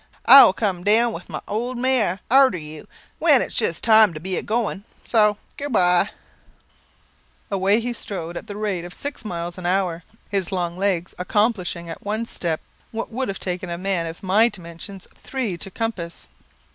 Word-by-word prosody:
I 275 - +11
will - - +5
come 190 -5 -2
down 225 +3 +4
with - - -9
my - - -5
old 240 +4 -2
mare 240 -7 +2
arter 265 -6 +6
you, 155 -1 -10 0.3
when - - +6
its - - -7
just 165 - 0
time 220 -5 +6
to - - -5
be 185 +3 -3
a - - -1
goin'. 215 -3 -1 0.2
So 210 -3 +3 0.2
good 285 0 -3
bye." 180 -5 +3 1.4
Away 195 +2 +2
he 240 +1 -3
strode 175 -7 -6
at - - -7
the 205 - -7
rate 205 -5 -2
of 175 0 -9
six 285 -3 -6
miles 175 -3 -5
an 175 - -4
hour; 180 -2 0 0.3
his 195 -3 -1
long 175 -2 -2
legs 185 -2 -1
accomplishing 185 -3 0
at 165 - -8
one 215 +3 -2
step 170 -7 -3 0.3
what 225 +1 -5
would 255 +3 -2
have 195 - -4
taken 180 -1 -4
a 170 - -3
man 185 -2 -1
of 165 +3 -9
my 210 +5 +4
dimensions 180 +1 -9 0.2
three 250 -9 -3
to 195 - -6
compass. 195 -6 -5
195 Hz, 185 wpm, -22 LUFS, 175-220 Hz, 1.4 s, I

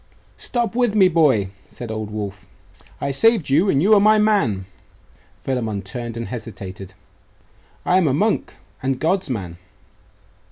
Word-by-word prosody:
'Stop 235 -4 -2
with 240 -4 +1
me, 195 -3 +6
boy!' 145 - +3 0.2
said 120 -2 -8
old 110 -1 -4
Wulf. 100 -2 -6 0.5
'I 140 - -2
saved 215 - +3
you; 165 +8 +4
and 140 -2 +2
you 210 +3 +5
are 210 - +7
my 215 +2 +5
man.' 175 - +2 0.8
Philammon 110 -6 -2
turned 115 +4 -6
and 115 - -5
hesitated. 100 -5 -8 0.9
'I 180 - +3
am 185 -4 +3
a 135 - +2
monk, 215 +8 0 0.3
and 130 0 -1
God's 185 +1 0
man. 95 -8 -4
135 Hz, 150 wpm, -21 LUFS, -, 0.9 s, are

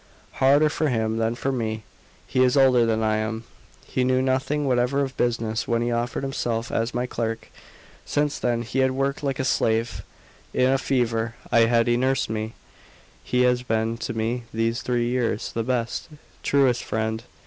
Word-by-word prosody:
"Harder 140 +3 +5
for 155 0 0
him 110 -2 0
than 115 +1 0
for 135 +3 -1
me; 110 -4 -2 0.4
he 130 - 0
is 125 +2 +3
older 130 -3 +5
than 110 0 +1
I 110 0 +2
am. 110 +1 -3 0.4
He 130 - -1
knew 130 0 +2
nothing 135 +3 0
whatever 125 +2 +2
of 135 -1 -2
business 115 -2 -1
when 115 -1 +1
he 120 - -1
offered 120 +3 -2
himself 120 -4 -2
as 115 +2 -1
my 125 +1 0
clerk; 115 -2 -3 0.5
since 145 0 -1
then 120 -1 0
he 120 +3 -3
has 130 0 +4
worked 135 +2 -1
like 135 -2 -1
a 130 - -1
slave. 115 -2 +1 0.5
In 130 +1 +4
a 135 - +2
fever 115 -3 0 0.2
I 115 -1 +6
had 115 0 +3
he 120 0 +2
nursed 130 -2 +1
me; 110 0 -3 0.7
he 125 0 +1
has 125 0 +3
been 115 -2 0
to - - -3
me 115 +2 -2
these 115 +1 0
three 120 -1 0
years 120 -3 -1
the 115 - -2
best, 120 +3 -2 0.3
truest 135 -4 +2
friend. 110 0 -2
120 Hz, 180 wpm, -24 LUFS, 115-130 Hz, 0.7 s, I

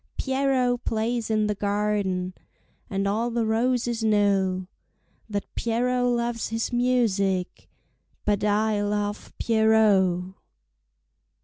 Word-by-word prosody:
Pierrot 265 -2 +1
plays 225 +1 -1
in 215 -1 +2
the 210 - 0
garden, 200 -3 -1 0.6
And 195 0 -1
all 220 +4 0
the 235 -1 -1
roses 235 +1 0
know 195 -3 +2 0.6
That 205 -1 -4
Pierrot 245 +2 0
loves 235 -1 -1
his 225 +2 -3
music, 210 -7 0 0.6
But 205 -1 +1
I 210 0 +1
love 205 0 -2
Pierrot. 205 -5 +3
215 Hz, 100 wpm, -25 LUFS, 200-235 Hz, 0.6 s, Pierrot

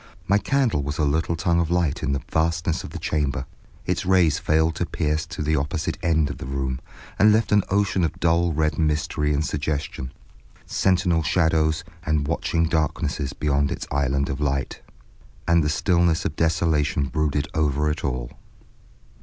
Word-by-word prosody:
My 100 +2 +4
candle 130 - +1
was 70 +2 -4
a 75 - +1
little 80 +3 0
tongue 85 +1 +1
of 85 -2 0
light 85 -4 0
in 65 - -1
the 70 - -2
vastness 80 0 0
of - - -7
the - - -7
chamber; 70 -4 -1 0.4
its - - -1
rays 90 -5 +3
failed 80 +1 +2
to - - 0
pierce 75 +1 -1
to - - -5
the 80 +1 +1
opposite 75 +2 -2
end 80 -3 +1
of - - -8
the - - -6
room, 65 -1 -2 0.4
and 105 +1 +6
left 110 +2 +2
an 105 0 +5
ocean 100 -2 +1
of 80 - -2
dull 85 0 +2
red 75 +1 0
mystery 75 -1 0
and 75 +1 0
suggestion, 70 -2 -3 0.5
sentinel 90 -3 +2
shadows 80 0 +1 0.2
and 75 -2 0
watching 85 +1 0
darknesses 75 -3 -1
beyond 70 -1 0
its - - -4
island 70 0 0
of 70 +2 -4
light. 70 -2 -2 0.7
And 85 -1 +4
the 75 - 0
stillness 85 0 +2
of 75 - -2
desolation 75 -4 +1
brooded 75 0 -1
over 75 -1 +1
it 80 - -5
all. 60 -2 -3
80 Hz, 170 wpm, -23 LUFS, 70-85 Hz, 0.7 s, and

